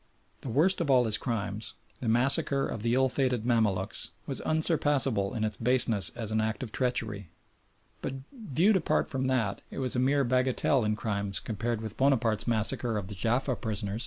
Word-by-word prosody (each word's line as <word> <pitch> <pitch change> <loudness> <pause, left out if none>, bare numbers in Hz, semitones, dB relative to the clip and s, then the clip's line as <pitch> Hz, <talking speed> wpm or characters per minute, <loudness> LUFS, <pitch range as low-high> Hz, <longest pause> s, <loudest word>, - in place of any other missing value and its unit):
The 130 - -6
worst 165 +11 +2
of 160 - -1
all 125 -2 +5
his 110 -2 +1
crimes 110 -2 -3 0.2
the 120 - -2
massacre 135 +4 +3
of 110 - -5
the 115 +2 +1
ill 130 0 +3
fated 125 -3 -1
Mamaluks 105 -6 +1 0.2
was - - -3
unsurpassable 145 - +1
in 110 - -1
its 110 0 -2
baseness 120 -4 +3
as 110 -2 -3
an 110 0 +1
act 110 +2 -2
of 115 - -6
treachery, 110 -7 -2 0.7
but 135 - -4 0.2
viewed 205 - +2
apart 165 - 0
from 130 -1 -1
that 115 -7 0
it - - -10
was 130 -2 -1
a - - +1
mere 140 +2 +2
bagatelle 130 +1 +1
in 105 0 0
crime 100 -2 -3
compared 115 +1 -3
with 110 -1 -7
Bonaparte's 120 -6 +1
massacre 115 0 0
of 100 -2 -5
the - - -5
Jaffa 120 +7 0
prisoners. 105 -1 -3
120 Hz, 185 wpm, -29 LUFS, 110-130 Hz, 0.7 s, all